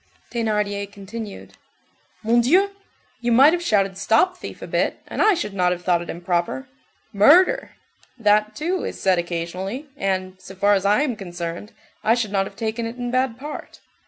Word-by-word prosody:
Thénardier 210 Hz, -3 st, -1 dB
continued:— 205 Hz, +1 st, -8 dB, 0.7 s
"Mon 235 Hz, +2 st, +4 dB
Dieu! 370 Hz, +11 st, +3 dB, 0.5 s
You 240 Hz, 0 st, -1 dB
might 270 Hz, +7 st, +7 dB
have 350 Hz, -, 0 dB
shouted 195 Hz, -, +1 dB
'stop 225 Hz, -, +3 dB
thief' 365 Hz, -, -9 dB
a -, -, -4 dB
bit, -, -, 0 dB
and -, -, -3 dB
I 425 Hz, -2 st, +5 dB
should 210 Hz, -, -4 dB
not 180 Hz, -2 st, +2 dB
have 180 Hz, 0 st, -3 dB
thought 175 Hz, -2 st, +2 dB
it 175 Hz, -, -8 dB
improper. 175 Hz, +9 st, -2 dB, 0.5 s
'Murder!' 340 Hz, -, +5 dB, 0.4 s
That, 215 Hz, -1 st, +2 dB
too, 350 Hz, +7 st, -2 dB
is -, -, -5 dB
said 185 Hz, -2 st, +2 dB
occasionally, 180 Hz, -, -4 dB
and, 185 Hz, -4 st, -2 dB
so 190 Hz, -, -11 dB
far 200 Hz, +2 st, +3 dB
as 195 Hz, -1 st, +1 dB
I 210 Hz, +7 st, +4 dB
am 260 Hz, -6 st, -1 dB
concerned, 175 Hz, +1 st, -6 dB, 0.3 s
I 225 Hz, +2 st, +4 dB
should 225 Hz, -4 st, -2 dB
not 195 Hz, -1 st, +1 dB
have 195 Hz, -, -13 dB
taken 225 Hz, +2 st, -3 dB
it 230 Hz, +2 st, -8 dB
in 245 Hz, -1 st, -3 dB
bad 255 Hz, -2 st, 0 dB
part. 295 Hz, +3 st, -8 dB
210 Hz, 180 wpm, -22 LUFS, 190-245 Hz, 0.7 s, might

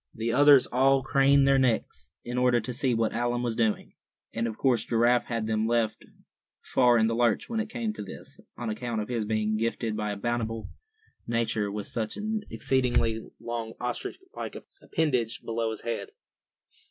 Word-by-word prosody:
The 115 Hz, +1 st, -1 dB
others 140 Hz, 0 st, +7 dB
all 135 Hz, +1 st, +3 dB
craned 140 Hz, +1 st, +4 dB
their 135 Hz, -1 st, +5 dB
necks 125 Hz, -4 st, 0 dB
in 125 Hz, +1 st, -3 dB
order 125 Hz, -1 st, +4 dB
to 125 Hz, +2 st, -5 dB
see 130 Hz, -1 st, +1 dB
what 115 Hz, -1 st, 0 dB
Allan 120 Hz, 0 st, -1 dB
was 120 Hz, -2 st, -1 dB
doing; 110 Hz, -3 st, 0 dB, 0.4 s
and 115 Hz, +1 st, -1 dB
of 110 Hz, -, -5 dB
course 125 Hz, -5 st, +2 dB
Giraffe 120 Hz, +1 st, +2 dB
had 115 Hz, -2 st, -2 dB
them 110 Hz, 0 st, 0 dB
left 115 Hz, -2 st, 0 dB, 0.6 s
far 125 Hz, -2 st, +4 dB
in 110 Hz, -, +4 dB
the 115 Hz, -, +1 dB
lurch 115 Hz, -2 st, +1 dB
when 230 Hz, -1 st, -2 dB
it 220 Hz, 0 st, -2 dB
came 225 Hz, -2 st, -3 dB
to -, -, -7 dB
this, 100 Hz, -, -10 dB, 0.2 s
on 120 Hz, -3 st, -3 dB
account 115 Hz, +1 st, -3 dB
of 105 Hz, -, -6 dB
his 115 Hz, -3 st, -1 dB
being 110 Hz, 0 st, 0 dB
gifted 115 Hz, 0 st, -1 dB
by 105 Hz, -1 st, -2 dB
a 100 Hz, -, -4 dB
bountiful 115 Hz, 0 st, -2 dB, 0.6 s
Nature 115 Hz, -3 st, 0 dB
with 105 Hz, 0 st, -4 dB
such 110 Hz, -, -4 dB
an 215 Hz, +1 st, -2 dB
exceedingly 120 Hz, -4 st, +1 dB, 0.2 s
long 115 Hz, -1 st, -4 dB
ostrich 125 Hz, 0 st, -3 dB, 0.2 s
like -, -, -5 dB
appendage 130 Hz, -, -2 dB
below 115 Hz, 0 st, -1 dB
his 110 Hz, -, -5 dB
head. 115 Hz, -4 st, -4 dB
115 Hz, 180 wpm, -27 LUFS, 110-125 Hz, 0.6 s, others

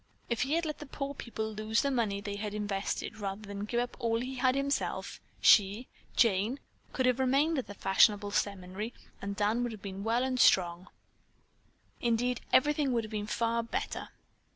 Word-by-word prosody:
If 235 Hz, -, +1 dB
he 270 Hz, +4 st, 0 dB
had 335 Hz, +1 st, +1 dB
let 305 Hz, -1 st, -4 dB
the 295 Hz, -, -8 dB
poor 275 Hz, +1 st, -4 dB
people 220 Hz, -4 st, -5 dB
lose 215 Hz, +3 st, 0 dB
the 280 Hz, -, +1 dB
money 215 Hz, -6 st, 0 dB
they 205 Hz, -1 st, -4 dB
had 210 Hz, 0 st, -4 dB
invested 205 Hz, +1 st, -3 dB
rather 200 Hz, +1 st, -4 dB
than 200 Hz, 0 st, -5 dB
give 235 Hz, +3 st, -1 dB
up 245 Hz, 0 st, -2 dB
all 230 Hz, -2 st, +1 dB
he 255 Hz, +2 st, -4 dB
had 255 Hz, 0 st, +3 dB
himself, 275 Hz, +1 st, -2 dB, 0.2 s
she, 210 Hz, +3 st, +5 dB, 0.3 s
Jane, 225 Hz, +2 st, +3 dB, 0.3 s
could 260 Hz, -, 0 dB
have 255 Hz, 0 st, +2 dB
remained 275 Hz, +4 st, +2 dB
at 260 Hz, -, -5 dB
the 205 Hz, -, -8 dB
fashionable 205 Hz, +2 st, +3 dB
seminary 200 Hz, +2 st, -2 dB, 0.3 s
and 200 Hz, 0 st, -4 dB
Dan 210 Hz, +4 st, +1 dB
would 240 Hz, -1 st, -1 dB
have 215 Hz, -3 st, -9 dB
been 195 Hz, 0 st, -6 dB
well 230 Hz, +3 st, +1 dB
and 260 Hz, -1 st, -1 dB
strong. 175 Hz, -3 st, +4 dB, 1.1 s
Indeed 240 Hz, +1 st, +1 dB
everything 295 Hz, -1 st, +3 dB
would 230 Hz, -1 st, +1 dB
have 215 Hz, -, -8 dB
been 210 Hz, -1 st, -3 dB
far 230 Hz, +1 st, 0 dB
better. 230 Hz, -, -4 dB
225 Hz, 185 wpm, -31 LUFS, 205-255 Hz, 1.1 s, she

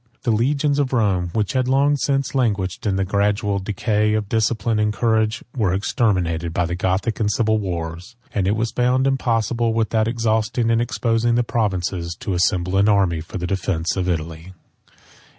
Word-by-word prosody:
The 120 Hz, -, +1 dB
legions 140 Hz, +6 st, +1 dB
of 135 Hz, -2 st, 0 dB
Rome, 95 Hz, -7 st, +1 dB
which 105 Hz, -3 st, -1 dB
had 130 Hz, -1 st, +1 dB
long 140 Hz, +2 st, +3 dB
since 135 Hz, -2 st, -1 dB
languished 105 Hz, -7 st, -1 dB
in 100 Hz, -, +1 dB
the 95 Hz, 0 st, 0 dB
gradual 100 Hz, +1 st, 0 dB
decay 105 Hz, +2 st, 0 dB
of 105 Hz, -2 st, -2 dB
discipline 110 Hz, 0 st, 0 dB
and 105 Hz, 0 st, +2 dB
courage, 110 Hz, +1 st, 0 dB
were 100 Hz, -7 st, +1 dB
exterminated 90 Hz, -, 0 dB
by 90 Hz, -, +1 dB
the 85 Hz, -, -3 dB
Gothic 95 Hz, +5 st, -1 dB
and 105 Hz, -2 st, +1 dB
civil 110 Hz, +1 st, +1 dB
wars; 85 Hz, +3 st, -5 dB, 0.2 s
and 95 Hz, -3 st, 0 dB
it 100 Hz, -, +2 dB
was 115 Hz, +1 st, -1 dB
found 125 Hz, +2 st, +1 dB
impossible, 120 Hz, -3 st, 0 dB
without 110 Hz, -1 st, +1 dB
exhausting 115 Hz, 0 st, 0 dB
and 115 Hz, 0 st, +2 dB
exposing 115 Hz, 0 st, 0 dB
the 120 Hz, -, +2 dB
provinces, 95 Hz, -7 st, -2 dB
to 95 Hz, -, -2 dB
assemble 90 Hz, +1 st, +1 dB
an 100 Hz, +2 st, +4 dB
army 95 Hz, -6 st, +2 dB
for 85 Hz, -, -7 dB
the 90 Hz, -, -3 dB
defence 90 Hz, -2 st, -1 dB
of 95 Hz, -1 st, -1 dB
Italy. 80 Hz, +1 st, -4 dB
105 Hz, 175 wpm, -21 LUFS, 95-115 Hz, 0.2 s, an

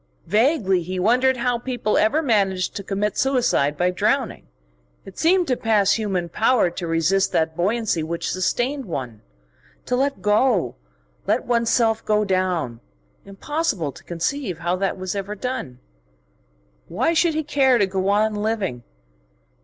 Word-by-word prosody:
Vaguely 210 Hz, -, +2 dB
he 185 Hz, +2 st, -5 dB
wondered 250 Hz, +7 st, +3 dB
how 245 Hz, 0 st, 0 dB
people 240 Hz, -4 st, -2 dB
ever 285 Hz, +10 st, +2 dB
managed 195 Hz, -7 st, +1 dB
to 200 Hz, -, -5 dB
commit 200 Hz, +1 st, -2 dB
suicide 245 Hz, -, +1 dB
by 180 Hz, +1 st, +2 dB
drowning; 180 Hz, -, -1 dB, 0.6 s
it 195 Hz, -, -11 dB
seemed 355 Hz, +2 st, +3 dB
to 255 Hz, -, +1 dB
pass 210 Hz, -4 st, +2 dB
human 195 Hz, -6 st, -1 dB
power 220 Hz, +1 st, +2 dB
to 170 Hz, 0 st, -5 dB
resist 165 Hz, +4 st, +1 dB
that 160 Hz, 0 st, 0 dB
buoyancy 200 Hz, 0 st, 0 dB
which 165 Hz, +2 st, -3 dB
sustained 245 Hz, +9 st, -1 dB
one, 125 Hz, -, -6 dB, 0.6 s
to 250 Hz, -, 0 dB
let 275 Hz, +2 st, 0 dB
go, 210 Hz, -, +2 dB, 0.5 s
let -, -, +1 dB
one's 235 Hz, -1 st, +1 dB
self 225 Hz, -2 st, +2 dB
go 210 Hz, 0 st, +1 dB
down. 185 Hz, -, -1 dB, 0.5 s
Impossible 200 Hz, -, -2 dB
to -, -, -15 dB
conceive 180 Hz, -, -3 dB
how 175 Hz, +2 st, -1 dB
that 195 Hz, +1 st, -2 dB
was 185 Hz, -1 st, -4 dB
ever 200 Hz, +1 st, -4 dB
done.... 250 Hz, -, -5 dB, 1.1 s
Why 250 Hz, -, 0 dB
should 330 Hz, -1 st, +2 dB
he 315 Hz, -, 0 dB
care 270 Hz, -4 st, +3 dB
to 205 Hz, -, +3 dB
go 190 Hz, 0 st, -1 dB
on 215 Hz, +2 st, +2 dB
living? 205 Hz, -, -2 dB
210 Hz, 150 wpm, -22 LUFS, 180-245 Hz, 1.1 s, wondered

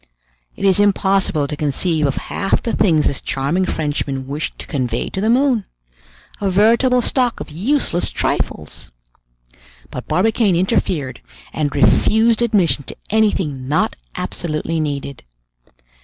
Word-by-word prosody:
It -, -, -3 dB
is 195 Hz, +1 st, +5 dB
impossible 195 Hz, -6 st, +2 dB
to 150 Hz, -, -4 dB
conceive 150 Hz, +2 st, 0 dB
of 135 Hz, -, -1 dB
half 195 Hz, -, -1 dB
the 230 Hz, -, -1 dB
things 160 Hz, -6 st, +3 dB
this 140 Hz, -, -1 dB
charming 155 Hz, +8 st, -1 dB
Frenchman 145 Hz, -3 st, -2 dB
wished 150 Hz, +5 st, -4 dB
to -, -, -8 dB
convey 125 Hz, -5 st, -2 dB
to 190 Hz, -, -3 dB
the 215 Hz, -, +1 dB
moon. 250 Hz, -2 st, +3 dB, 0.8 s
A 200 Hz, -, +1 dB
veritable 235 Hz, +6 st, +4 dB
stock 250 Hz, -2 st, 0 dB
of -, -, -7 dB
useless 190 Hz, -, 0 dB
trifles! -, -, -3 dB, 1.0 s
But -, -, -7 dB
Barbicane 210 Hz, 0 st, +2 dB
interfered 170 Hz, -, -1 dB, 0.3 s
and 145 Hz, -3 st, -2 dB
refused 220 Hz, -, +3 dB
admission 185 Hz, -, +2 dB
to -, -, -8 dB, 0.2 s
anything 185 Hz, -12 st, 0 dB
not 150 Hz, +3 st, +1 dB, 0.2 s
absolutely 165 Hz, 0 st, -2 dB
needed. 140 Hz, -2 st, -4 dB
175 Hz, 130 wpm, -19 LUFS, 145-215 Hz, 1.0 s, is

